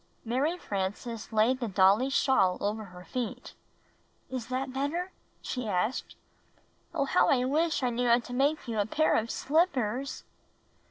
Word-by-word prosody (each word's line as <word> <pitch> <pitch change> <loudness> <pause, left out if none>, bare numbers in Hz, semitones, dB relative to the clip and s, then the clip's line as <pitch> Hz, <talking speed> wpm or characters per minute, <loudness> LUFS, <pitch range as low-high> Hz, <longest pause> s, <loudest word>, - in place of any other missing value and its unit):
Mary 275 +9 0
Frances 210 - -4
laid 225 +4 +3
the 240 - -2
dolly's 200 +6 +4
shawl 195 -10 +3
over 215 +1 -2
her 180 -1 -12
feet. 250 -3 -5 0.8
"Is 255 -3 -4
that 255 +1 -3
better?" 315 +7 -2 0.3
she 250 -3 -3
asked. 210 +6 -1 0.8
"Oh, - - 0
how - - +3
I 250 -2 +3
wish 310 +2 +1
I 250 - +2
knew 245 +1 0
how 235 0 +6
to 245 0 -7
make 280 +3 +1
you 225 -2 -2
a 205 - +1
pair 310 +7 +2
of 225 +1 0
slippers!" 275 - 0
245 Hz, 155 wpm, -29 LUFS, 215-270 Hz, 0.8 s, how